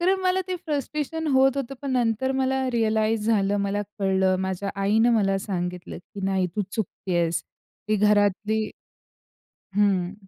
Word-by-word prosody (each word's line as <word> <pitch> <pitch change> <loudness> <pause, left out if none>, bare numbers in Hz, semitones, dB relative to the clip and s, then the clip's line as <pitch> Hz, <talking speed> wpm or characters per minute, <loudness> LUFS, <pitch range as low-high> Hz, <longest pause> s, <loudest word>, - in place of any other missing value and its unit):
कारण 380 +2 +2
मला 370 0 +2
ते 365 - -1
फ्रस्ट्रेशन 305 +2 -2
होत 265 +1 +4
होतं. 275 0 -3
पण 280 - -3
नंतर 245 +1 +1
मला 265 0 0
रिअलाईज 220 -1 +1
झालं, 205 -3 +2
मला 200 +1 -1 0.2
कळलं, 190 -1 +2
माझ्या 190 +1 -2
आईने 220 +4 +4
मला 195 -2 +2
सांगितलं 180 -3 -4
की 200 +3 -11
"नाही, 190 -1 +1
तू 205 - +2
चुकत 215 -3 -5
आहेस, 170 -1 +1 0.5
ती 215 - +3
घरातली" 210 +1 +2 1.1
हं. 195 -3 +2
210 Hz, 145 wpm, -25 LUFS, 195-265 Hz, 1.1 s, होत